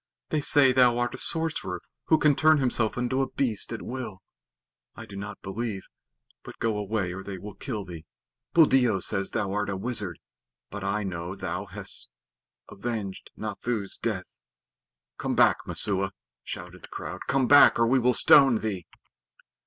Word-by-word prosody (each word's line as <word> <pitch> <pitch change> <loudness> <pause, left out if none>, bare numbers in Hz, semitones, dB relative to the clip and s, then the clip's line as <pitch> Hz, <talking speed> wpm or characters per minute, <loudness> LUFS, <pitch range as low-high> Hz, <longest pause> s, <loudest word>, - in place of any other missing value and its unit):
They 155 - 0
say 140 -2 +5
thou 125 -2 +4
art 120 0 -1
a - - -5
sorcerer 160 - -1 0.3
who 160 - +4
can 150 -2 +3
turn 155 +1 +5
himself 120 -5 +1
into 125 +2 0
a 135 - -1
beast 115 -6 -1
at 115 - -5
will. 115 -7 -6 0.7
I 115 - -9
do 105 -3 -11
not 100 +1 -7
believe, 100 0 -4 0.6
but - - -11
go 115 -2 0
away 100 -3 -2
or 95 - -6
they 95 0 -7
will 100 +3 -9
kill 110 -7 -5
thee. 85 -3 -9 0.5
Buldeo 130 - +5
says 95 +1 -1
thou 100 -4 -2
art 105 0 -1
a 100 - -2
wizard, 105 -4 -3 0.5
but 100 -1 -6
I 100 +2 -1
know 90 -1 -4
thou - - -4
hast - - -3 0.6
avenged 100 -3 -5
Nathoo's 110 -5 -3
death." 100 -5 -3 0.9
"Come - - -1
back, - - +5
Messua!" 95 -1 0 0.3
shouted 90 +1 -8
the - - -11
crowd. - - -7
"Come 135 -2 +2
back, 145 +2 +8
or 115 - +4
we 130 +3 +3
will 125 0 +2
stone 135 -5 +6
thee." 95 -6 -4
110 Hz, 165 wpm, -27 LUFS, 95-125 Hz, 0.9 s, back